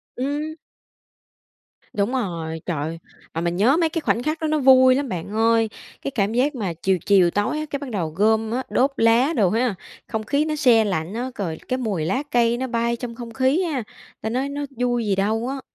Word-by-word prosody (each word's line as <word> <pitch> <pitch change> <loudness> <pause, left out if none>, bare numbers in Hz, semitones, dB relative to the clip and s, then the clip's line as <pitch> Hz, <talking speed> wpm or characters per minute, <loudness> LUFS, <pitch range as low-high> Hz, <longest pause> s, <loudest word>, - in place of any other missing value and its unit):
Ừm. 290 +4 -2 1.4
Đúng 205 +2 0
rồi, 165 -10 -3
trời 175 -4 -2
ơi, 165 +2 -4 0.3
mà 165 - -2
mình 170 0 -1
nhớ 245 - +4
mấy 330 -2 +2
cái 330 - -3
khoảnh 240 -4 0
khắc 310 +1 -1
đó 315 - 0
nó 310 0 +1
vui 260 -1 +6
lắm 275 -2 -2
bạn 175 -1 -4
ơi. 225 0 +3 0.3
Cái 275 - -3
cảm 210 -3 0
giác 265 +4 +1
mà 195 -8 -2
chiều 190 +3 0
chiều 190 -4 +5
tối 205 +9 0
á, 310 - -3
cái 280 - -3
bắt 280 -2 -6
đầu 180 -8 -2
gom 220 +6 +1
á, 255 +3 -1
đốt 270 +3 +2
lá 230 +7 +4
đồ 195 -5 +3
ha, 230 0 +1 0.3
không 220 -1 -3
khí 285 +6 +1
nó 305 -1 -1
se 245 -7 +5
lạnh 175 -1 -2
á, 245 +3 -3
rồi 170 -6 -3
cái 255 - 0
mùi 200 -11 -2
lá 225 - 0
cây 235 -1 +3
nó 260 +1 -2
bay 235 0 0
trong 235 -1 -6
không 235 -1 -8
khí 265 +9 +2
ha, 290 -8 -2 0.4
ta 220 - -2
nói 260 +4 -1
nó 285 0 -3
vui 245 -2 0
gì 200 - +1
đâu 220 +5 0
á. 275 0 -4
235 Hz, 225 wpm, -22 LUFS, 200-265 Hz, 1.4 s, vui